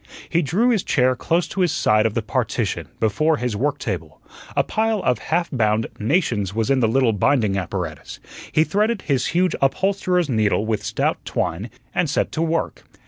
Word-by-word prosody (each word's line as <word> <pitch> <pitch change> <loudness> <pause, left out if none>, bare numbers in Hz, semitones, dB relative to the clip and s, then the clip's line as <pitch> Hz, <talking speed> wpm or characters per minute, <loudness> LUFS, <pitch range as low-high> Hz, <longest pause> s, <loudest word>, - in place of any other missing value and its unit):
He 170 - +1
drew 195 - +1
his 225 -6 +2
chair 130 -2 +2
close 165 +7 0
to 195 - -2
his 175 -3 +3
side 110 +1 +3
of 110 - -5
the - - 0
partition, - - -2
before 155 +9 +2
his 125 -4 -2
work 140 +6 0
table. 90 - -5 0.4
A - - +3
pile 220 -2 0
of 125 -8 +1
half 170 +1 -1
bound 110 -4 +1
"Nations" 110 - 0
was 115 +2 0
in 135 - +3
the 115 - +3
little 120 0 +2
binding 105 -1 +2
apparatus; 90 -4 -5 0.3
he 155 - +4
threaded 210 +4 0
his 135 -4 0
huge 180 +1 +1
upholsterer's 180 +4 +1
needle 110 -4 +1
with 110 -1 -1
stout - - -1
twine 100 +9 -2 0.2
and 170 - +1
set 150 - 0
to 160 - -2
work. 165 0 -1
135 Hz, 185 wpm, -22 LUFS, 110-170 Hz, 0.4 s, he